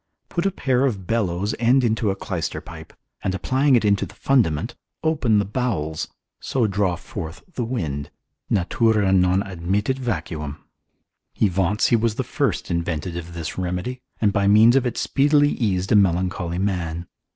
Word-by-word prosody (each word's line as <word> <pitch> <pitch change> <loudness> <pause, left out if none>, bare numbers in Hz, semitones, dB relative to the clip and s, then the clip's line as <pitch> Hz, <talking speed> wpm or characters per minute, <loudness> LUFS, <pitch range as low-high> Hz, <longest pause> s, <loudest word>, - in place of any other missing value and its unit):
Put 175 +2 0
a - - 0
pair 130 -7 +1
of 100 -7 -3
bellows 100 -2 0
end 125 +3 +4
into 110 -2 +1
a 95 - 0
clyster 90 -3 -3
pipe, 80 -1 -11 0.3
and 95 - 0
applying 130 +8 +2
it 115 - +2
into 100 -1 +2
the 105 - -16
fundament, 105 - +1 0.3
open 145 -9 +2
the 100 - +2
bowels, 100 -9 -2 0.3
so 125 -4 0
draw 100 -3 +1
forth 85 0 -7
the 125 - -2
wind, 80 - -3 0.4
natura 105 +1 +2
non 90 +1 +3
admittit 95 +7 -1
vacuum. 80 - -3 0.8
He 105 - +3
vaunts 95 +3 +1
he 120 - +5
was 115 -1 +1
the - - -1
first - - -1
invented 85 0 -2
this 85 0 -5
remedy, 90 +8 -3 0.2
and 105 -2 +2
by 100 -2 +2
means 110 +4 +6
of 135 -2 +3
it 120 - -4
speedily 145 +1 +3
eased 95 -8 -1
a - - +6
melancholy 90 -2 +1
man. 90 -4 -2
100 Hz, 160 wpm, -23 LUFS, 85-120 Hz, 0.8 s, means